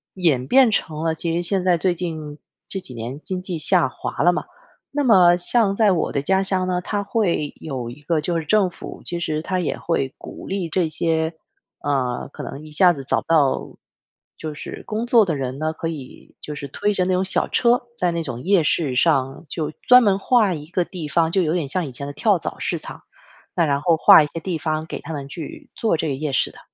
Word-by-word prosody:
演 150 -9 +1
变 260 - +5
成 160 -5 -1
了 165 - +1
其 165 +1 -2
实 175 - -1
现 190 +1 0
在 180 -2 +3
最 180 +1 +1
近 155 -4 -5 0.3
这 195 - -3
几 130 - -8
年 120 +5 -6
经 185 -1 -4
济 180 -2 -4
下 165 -1 +3
滑 - - -4
了 175 - +5
嘛， - - -3 0.5
那 290 0 0
么 180 -7 +6
像 200 +2 +3
在 215 -1 +4
我 175 - 0
的 140 - -1
家 190 +6 +2
乡 185 -1 0
呢， 180 -1 0
它 205 +2 -2
会 195 -9 0
有 130 -6 -5
一 130 +5 -11
个 160 +1 0
就 170 +2 -1
是 160 - -5
政 210 -1 +3
府， 175 - -10
其 175 - 0
实 155 -2 -2
它 185 +2 -2
也 170 - -2
会 135 -6 -1
鼓 - - -10
励 190 -3 -2
这 170 0 +1
些， 160 0 0 0.5
嗯， 130 -4 -1
可 - - -7
能 150 +3 -7
一 155 - -12
下 180 +4 +5
子 140 - -7
找 - - +1
不 - - -25
到 150 -5 +3 0.8
就 155 -1 -5
是 150 - -8
工 220 +2 -2
作 235 -3 +6
的 165 -5 -1
人 130 0 -4
呢， 155 0 0
可 165 - -4
以 145 -6 -9
就 150 - -6
是 140 0 -6
推 205 +9 -1
着 185 -2 +1
那 185 - +1
种 185 +1 +2
小 190 - +1
车， 240 0 +3 0.2
在 180 -1 +1
那 170 0 -2
种 125 -4 -5
夜 195 -1 +4
市 145 -4 0
上 135 0 +1
就 155 -1 -3
专 250 0 +7
门 200 -3 +3
划 215 -3 +3
一 150 -2 -6
个 180 +1 0
地 170 -5 -7
方， 165 +2 +1
就 190 - +2
有 155 - 0
点 175 -4 0
像 175 +5 -1
以 - - -7
前 140 - -7
的 - - -5
跳 - - +2
蚤 - - -5
市 - - -1
场。 - - -9 0.5
那 170 - +3
然 140 -1 +1
后 165 0 +3
划 160 - +8
一 - - -2
些 165 - -6
地 175 -1 -2
方 155 0 -2
给 - - -6
他 165 - -7
们 140 -2 -5
去 160 0 -8
做 220 -7 +1
这 160 - -2
个 135 - -1
夜 150 +1 -3
市 - - +1
的。 - - -16
165 Hz, 260 characters per minute, -22 LUFS, 150-185 Hz, 0.8 s, 划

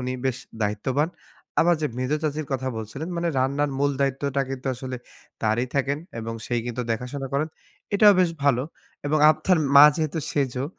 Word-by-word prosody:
উনি 125 0 -2
বেশ 125 -1 -1 0.2
দায়িত্ববান। 130 +9 0 0.5
আবার 175 +1 +4
যে - - +2
মেঝো 130 +4 0
চাচির 150 0 -2
কথা 130 0 -1
বলছিলেন 115 +9 -6
মানে 170 0 0
রান্নার 140 +3 +1
মূল 145 0 +2
দায়িত্বটা 140 0 0
কিন্তু 135 0 -6
আসলে 130 +1 -6 0.5
তারই 110 +3 +1
থাকেন। 140 +1 +1 0.2
এবং 115 0 -5
সেই 120 -1 0
কিন্তু 120 +1 -3
দেখাশোনা 130 +4 -4
করেন। 150 +3 +1 0.5
এটাও 205 0 +7
বেশ 180 -2 +3
ভালো। 130 -3 +3 0.4
এবং 155 +2 +2
আপনার 155 +3 +2 0.2
মা 140 - +11
যেহেতু 160 0 -1
সেজো 130 -2 -1
135 Hz, 165 wpm, -24 LUFS, 125-150 Hz, 0.5 s, মা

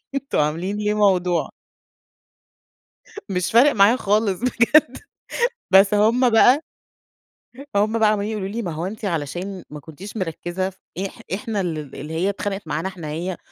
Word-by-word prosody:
أنتم 275 0 -2
عاملين 165 +7 -1
ليه 210 0 0
موضوع. 185 -4 +2 1.8
مش 180 -2 -1
فارق 255 +6 +6
معايا 210 +2 +5
خالص 205 -4 +1
بجد. 255 +2 +3 0.7
بس 195 +2 +6
هم 230 +5 +4
بقى 250 +6 +5 1.1
هم 215 +3 +2
بقى 215 - +4
عمّالين 210 +1 -1
يقولوا 200 -3 -3
لي: 225 +4 -4
"ما 180 -6 -4
هو 160 +3 -4
أنتِ 215 +3 -6
علشان 175 +2 -4
ما 150 0 -8
كنتيش 180 +9 -10
مركّزة 180 +1 -3
ف 190 - -21 0.3
إح - - -15
إحنا 215 -1 -2
ال 155 -6 -4
اللي 150 +3 -7
هي 180 +5 0
اتخانقت 200 -3 -4
معانا 155 +4 -2
إحنا 180 -5 -7
هي 170 +4 -4
195 Hz, 150 wpm, -22 LUFS, 175-215 Hz, 1.8 s, فارق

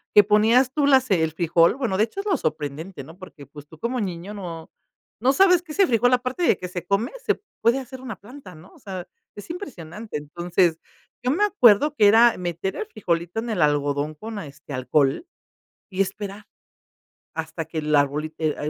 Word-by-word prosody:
que 210 - +9
ponías 225 +5 +4
tú 290 -2 +2
las 260 -5 +4
el 160 -3 +2
frijol, 170 +2 +3
bueno, 240 -8 -1
de 215 - +4
hecho 390 - -6
es - - -15
lo 385 -7 +1
sorprendente, 155 - -4
¿no?, 160 +6 -13
porque, 165 -6 -12
pues, 145 +1 -13
tú 160 - -15
como 240 +5 -2
niño 185 +1 -5
no 170 -5 -8 0.5
no 255 +5 +3
sabes 360 0 +5
que 320 - -11
ese 385 +3 +3
frijol 245 +2 +3
aparte 255 +7 0
de 200 - +4
que 180 - -5
se 175 -1 -6
come, 200 +6 0
se - - 0 0.2
puede 235 +4 +3
hacer 260 0 -9
una 250 -6 -6
planta, 210 - -12
¿no?, 160 +4 -16
o - - -19
sea, 185 -3 -7 0.3
es 205 - -10
impresionante, 215 - -7
entonces, 170 +2 0 0.4
yo 250 - +1
me 390 +8 +1
acuerdo 295 - +4
que 210 - +5
era 230 +3 +6
meter 175 +1 -3
el 435 - -4
frijolito 175 - -2
en 235 +1 -4
el 205 -7 -1
algodón 145 0 0
con, 220 +5 -7
este, 140 -3 -10
alcohol 135 - +1 0.6
y 190 0 -1
esperar, 200 +1 -4 0.9
hasta 160 +1 -4
que 160 0 -8
el 150 -1 +1
arbolito 150 +2 0
ea 150 -1 -1
195 Hz, 195 wpm, -23 LUFS, 160-245 Hz, 0.9 s, que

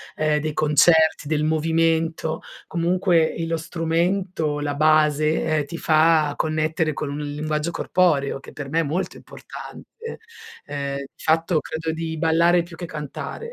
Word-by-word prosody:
ehm, 155 -1 +1
dei 155 0 -3
concerti, 155 +1 +4
del 155 0 0
movimento, 160 0 +1 0.3
comunque, 170 -1 +2
ehm, 165 0 -3
lo 165 - 0
strumento, 165 -1 -1
la 145 -1 -2
base, 155 0 +3
ehm, 155 -2 0
ti 150 - -8
fa 155 -1 +3
connettere 155 0 0
con 145 +1 -4
un 140 - -4
linguaggio 150 +2 -2
corporeo, 155 -8 +1
che - - -13
per 140 -2 -7
me 160 +3 +1
è - - +2
molto 165 +6 -3
importante. 460 0 -10 0.5
Ehm, 140 -1 -3
di 140 - -6 0.2
fatto 160 +1 +2
credo 160 +2 -4
di 160 0 -4
ballare 170 +2 +3
più 170 -1 -12
che 175 - -5
cantare, 155 - -6
160 Hz, 150 wpm, -23 LUFS, 150-165 Hz, 0.5 s, concerti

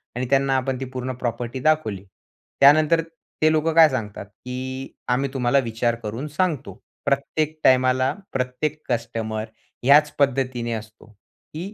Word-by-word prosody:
आणि 125 0 -2
त्यांना 135 0 +2
आपण 130 -1 -2
ती 135 - -4
पूर्ण 130 0 -3
प्रॉपर्टी 120 +2 -3
दाखवली. 110 -12 0 0.6
त्यानंतर, 155 +3 +6 0.4
ते 155 0 +5
लोकं 160 +1 +1
काय 160 -2 +8
सांगतात, 105 -6 -4
की 130 +5 -7 0.2
"आम्ही 135 +3 +1
तुम्हाला 130 +1 +2
विचार 115 +1 0
करून 115 +8 -4
सांगतो." 165 -7 -1 0.3
प्रत्येक 155 +3 -1
टाईमाला, 130 0 +4 0.2
प्रत्येक 135 +4 -2
कस्टमर, 115 -2 -2 0.4
ह्याच 150 +3 +6
पद्धतीने 130 -4 0
असतो, 110 0 -8 0.5
की 185 +7 -6
130 Hz, 135 wpm, -23 LUFS, 120-150 Hz, 0.6 s, काय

